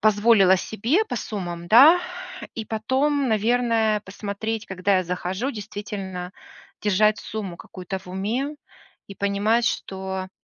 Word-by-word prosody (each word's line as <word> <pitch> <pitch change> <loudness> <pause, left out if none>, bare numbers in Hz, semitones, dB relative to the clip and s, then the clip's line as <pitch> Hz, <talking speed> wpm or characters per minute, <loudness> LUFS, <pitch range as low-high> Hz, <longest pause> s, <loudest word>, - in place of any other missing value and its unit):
позволила 205 -3 +5
себе 230 - 0
по 245 - -4
суммам, 175 -6 -5
да? 285 - +8 0.5
И 225 - -4
потом, 265 +5 0
наверное, 225 -1 +2
посмотреть, 210 +3 -5
когда 190 +1 +1
я - - 0
захожу, 180 +7 -2
действительно 195 -5 -6 0.5
держать 210 +1 +3
сумму 200 -5 -6
какую-то 185 +2 -7
в 190 - -20
уме 220 +11 -2 0.5
и 195 - -10
понимать, 200 +4 +1
что 190 -3 -3
210 Hz, 120 wpm, -24 LUFS, 190-230 Hz, 0.5 s, да